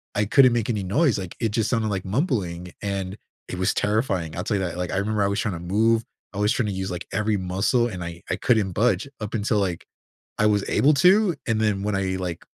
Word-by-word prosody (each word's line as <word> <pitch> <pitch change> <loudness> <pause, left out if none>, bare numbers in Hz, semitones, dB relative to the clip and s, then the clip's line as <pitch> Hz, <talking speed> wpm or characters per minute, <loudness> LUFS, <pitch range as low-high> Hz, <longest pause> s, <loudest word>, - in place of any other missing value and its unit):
I 105 0 +2
couldn't 130 +4 +6
make 115 -2 0
any 105 -4 -1
noise, 125 - +2
like, 95 -3 -6
it 115 - 0
just 110 +1 0
sounded 115 -3 +1
like 95 -3 -2
mumbling, 95 - -1
and 100 -1 -3 0.3
it - - -5
was 95 +1 +1
terrifying 100 -7 0
I'll 90 - -3
tell 105 - 0
you 95 - -1
that, 85 -1 -4
like, 90 -1 -3
I - - -1
remember 105 +1 0
I - - +2
was 100 +1 -1
tryna 95 -6 -2
move 110 +6 +2 0.3
I - - -7
was 105 +2 +2
tryna 115 -4 0
use, 95 0 -3
like, 90 -1 -6
every 105 +1 +1
muscle, 95 +6 +1
and 90 -6 -6
I 85 0 -7
I - - +1
couldn't 105 -3 +1
budge 110 +2 +1
up 105 0 -5
until, 105 -1 0
like, 90 -4 -2 0.5
I 105 - +3
was 105 -1 +2
able 150 +3 +4
to, 185 +5 +5
and 115 -2 +1
then 105 -3 +1
when 105 -1 -1
I, 95 -1 -1
like, 90 -2 -5
100 Hz, 240 wpm, -24 LUFS, 95-115 Hz, 0.5 s, couldn't